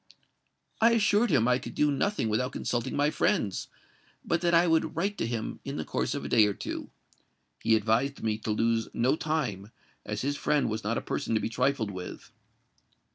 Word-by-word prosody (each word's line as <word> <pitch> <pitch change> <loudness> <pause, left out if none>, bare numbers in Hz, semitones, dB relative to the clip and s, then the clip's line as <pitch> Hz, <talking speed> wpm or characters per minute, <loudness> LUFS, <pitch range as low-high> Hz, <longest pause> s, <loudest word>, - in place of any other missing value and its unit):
"I 230 +1 +6
assured 215 +1 +3
him 135 -9 +3
that 125 - +3
I 125 - +3
could 120 - -8
do 150 -1 +3
nothing 200 - 0
without 120 +4 0
consulting 120 -1 -2
my 145 +1 +2
friends; 155 - 0 0.6
but 170 0 0
that 175 -1 +2
I 170 +1 +5
would 160 -2 +1
write 195 +5 -1
to - - 0
him 115 -2 -4
in 140 +1 -5
the - - -3
course - - -1
of 140 - -4
a - - -2
day 110 -3 +5
or 100 - -2
two. - - -5 0.7
He 115 - +4
advised 115 +6 0
me 110 -1 0
to 110 - -5
lose 115 +1 +1
no 125 +5 +2
time; 130 -12 -2 0.3
as 105 +2 -4
his 140 +1 -1
friend 150 -6 +1
was 110 0 -3
not 115 +3 -1
a - - -1
person 115 - -2
to - - +3
be 110 - -2
trifled 125 -2 0
with." 90 -1 -8
125 Hz, 205 wpm, -28 LUFS, 110-155 Hz, 0.7 s, I